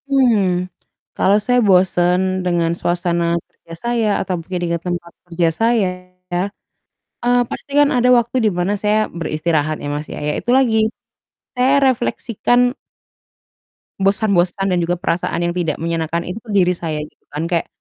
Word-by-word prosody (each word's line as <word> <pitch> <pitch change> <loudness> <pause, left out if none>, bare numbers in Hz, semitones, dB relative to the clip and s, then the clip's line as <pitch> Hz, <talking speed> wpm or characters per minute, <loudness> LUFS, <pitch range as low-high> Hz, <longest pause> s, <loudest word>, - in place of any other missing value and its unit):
Hmm, 210 -10 +2 0.5
kalau 200 +2 +4
saya 250 0 +3
bosen 185 0 +3
dengan 170 -2 +1
suasana 175 0 0 0.3
kerja 165 - -15
saya, 235 -2 0
atau 190 -1 -2
mungkin 180 +2 -5
dengan 170 0 -1
tempat 175 -1 -4 0.2
kerja 170 0 +1
saya, 225 -3 +3 1.2
eee, 245 +1 0
pasti - - -7
kan 290 - +5
ada 250 0 +3
waktu 240 +1 0
di 215 - +4
mana 180 +3 +1
saya 210 +1 +2 0.2
beristirahat 155 -1 -1
ya - - -4
Mas 150 +1 -4
ya. - - -6
Ya 150 - +1
itu - - -3
lagi, 250 -4 +3 0.8
saya 270 +3 +3
refleksikan 245 -1 +1 1.3
bosan-bosan 195 -1 +1
dan 180 - +2
juga 175 +1 0
perasaan 175 -1 -2
yang 175 0 0
tidak 165 -4 0
menyenangkan 165 0 -1
itu 180 +5 -6
ke 230 - -18
diri 180 -2 +4
saya, 160 -3 -3
gitu 150 - -16
kan, 150 +2 -2
kayak, 170 -2 0
180 Hz, 150 wpm, -19 LUFS, 170-230 Hz, 1.3 s, kan